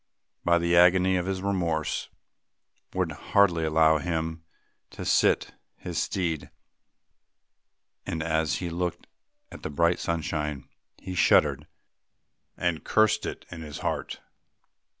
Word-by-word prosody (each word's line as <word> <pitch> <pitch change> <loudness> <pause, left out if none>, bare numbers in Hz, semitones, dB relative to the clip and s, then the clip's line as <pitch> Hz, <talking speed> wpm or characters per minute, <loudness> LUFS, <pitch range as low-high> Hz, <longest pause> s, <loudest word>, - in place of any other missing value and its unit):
But 85 0 +4
the 85 0 +2
agony 90 +2 +5
of 90 0 -2
his 95 -1 -2
remorse 85 -6 -1 0.9
would 90 -3 0
hardly 85 +1 +2
allow 80 0 +4
him 80 0 -3 0.5
to - - -8
sit - - +2 0.2
his - - -4
steed 85 -5 -2 1.6
and, 80 -1 -2
as 80 0 0
he 90 -2 -4
looked 90 0 -3 0.5
at - - -10
the - - -4
bright 85 +4 +2
sunshine, 75 -4 -3 0.3
he 95 - -7
shuddered 90 - +3 0.9
and 85 -3 -1
cursed 110 -2 +2
it - - -7
in 85 -2 -7
his 75 -3 -8
heart. - - -3
85 Hz, 120 wpm, -27 LUFS, 80-90 Hz, 1.6 s, agony